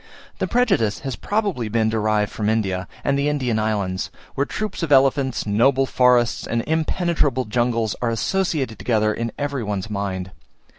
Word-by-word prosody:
The - - 0
prejudice 115 - +1
has 135 -2 -4
probably 200 - -1
been 110 0 +1
derived 110 -1 +1
from 105 -1 -1
India, 95 -5 0 0.2
and 140 0 +1
the 145 +1 +1
Indian 130 -7 0
islands, 100 -4 -1 0.2
where 140 +1 0
troops 215 -2 -4
of 165 -3 -2
elephants, 135 -1 +3
noble 125 +6 +3
forests, 125 -2 +2
and 115 0 -1
impenetrable 160 -4 0
jungles, 115 -1 0
are 120 - +1
associated 135 - -1
together 110 -3 +1
in 115 +1 -3
every 140 -2 -2
one's 105 -1 -3
mind. 95 -2 -3
120 Hz, 155 wpm, -22 LUFS, 110-140 Hz, 0.2 s, elephants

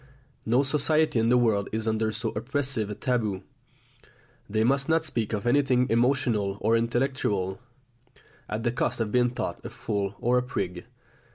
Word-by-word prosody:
No 125 +5 +3
society 150 -1 +2
in 115 +1 +2
the 125 - +5
world 110 -5 +2
is 110 0 -2
under 110 0 +1
so 110 +1 -2
oppressive 130 -1 -2
a 105 - -4
taboo. 110 -7 -1 1.1
They 110 +1 +1
must 135 +4 +1
not 160 0 +2
speak 115 -8 -2
of 105 0 -3
anything 125 0 +3
emotional 115 -5 +1
or 110 +2 +2
intellectual, 115 -5 0 0.9
at 110 +1 -3
the 120 - +1
cost 120 - -1
of 110 -2 -1
being 125 +1 +3
thought 120 - -5
a - - -6
fool 100 -2 -3
or 125 +1 +2
a - - 0
prig. 100 -6 -4
115 Hz, 165 wpm, -27 LUFS, 105-130 Hz, 1.1 s, the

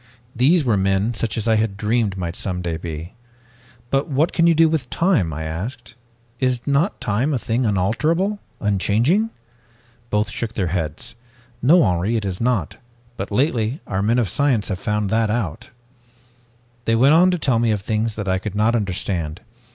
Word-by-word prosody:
These 145 +6 +3
were 115 -4 +2
men 95 +4 +1
such 110 -2 -2
as 110 - -2
I 110 -1 +4
had 110 -2 -1
dreamed 105 -1 0
might 85 -2 -4
some 90 -2 -3
day 85 -2 -2
be. 80 +2 -6 0.8
'But 135 +1 +1
what 150 +4 +1
can 170 -1 +3
you 165 - +4
do 165 +1 +5
with 155 -6 -1
time?' 165 - +1
I 80 +2 -5
asked. 105 - -6 0.5
'Is 125 -2 0
not 140 +3 +1
time 125 +8 0
a - - +1
thing 120 +1 -1
unalterable, 155 - 0 0.2
unchanging?' 110 - +1 0.8
"Both 105 +1 0
shook 115 -1 -4
their 95 -4 -1
heads. 85 - -3 0.5
'No, 160 +7 +6
Henri, 90 +5 +1
it 105 - -3
is 95 0 -3
not. 115 -9 0 0.4
But 100 - -5
lately 120 -1 +1
have 145 - -10
our 95 0 -2
men 110 +4 +2
of 120 -4 +2
science 125 +1 +1
found 105 +1 -2
that 110 0 +2
out.' 105 -9 -3 1.2
"They 115 - +2
went 135 +6 +5
on 175 +3 +6
to 180 - +1
tell 130 -7 +1
me 115 -1 +2
of 105 -2 0
things 110 +2 -1
that 105 -2 -5
I 95 0 +1
could 100 0 -6
not 110 +3 +2
understand. 90 -6 -2
110 Hz, 180 wpm, -21 LUFS, 95-130 Hz, 1.2 s, No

